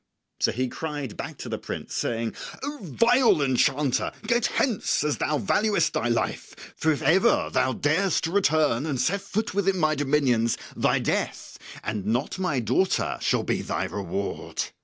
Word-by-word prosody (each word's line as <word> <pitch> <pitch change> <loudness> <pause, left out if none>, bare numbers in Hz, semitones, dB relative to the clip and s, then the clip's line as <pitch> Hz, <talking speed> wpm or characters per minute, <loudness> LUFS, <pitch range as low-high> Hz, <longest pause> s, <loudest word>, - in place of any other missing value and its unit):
So - - +2
he 130 +2 -1
cried 145 -3 -5
back - - -6
to - - -7
the - - -3
prince, - - -6
saying, 115 -1 -1 0.3
"O 290 +1 -4
vile 230 - +3
enchanter, 135 +1 +1
get 235 +1 +2
hence 225 - 0
as 150 -1 0
thou 150 - +1
valuest 205 - +2
thy 115 - 0
life, 120 -1 -3
for 160 - +1
if 150 - -2
ever 235 - +3
thou 130 - +2
darest 165 +5 +1
to 165 - -1
return 155 -8 +2
and 140 -5 -2
set 195 +10 +1
foot 220 +1 -3
within 195 -1 +1
my 155 -3 +2
dominions 135 -6 +1 0.2
thy - - +2
death - - -2 0.2
and 105 -2 -3
not 125 - -1
my 155 -8 0
daughter 125 - +1
shall - - +1
be - - -1
thy - - -2
reward!" 100 +1 -4
150 Hz, 165 wpm, -25 LUFS, 125-195 Hz, 0.3 s, vile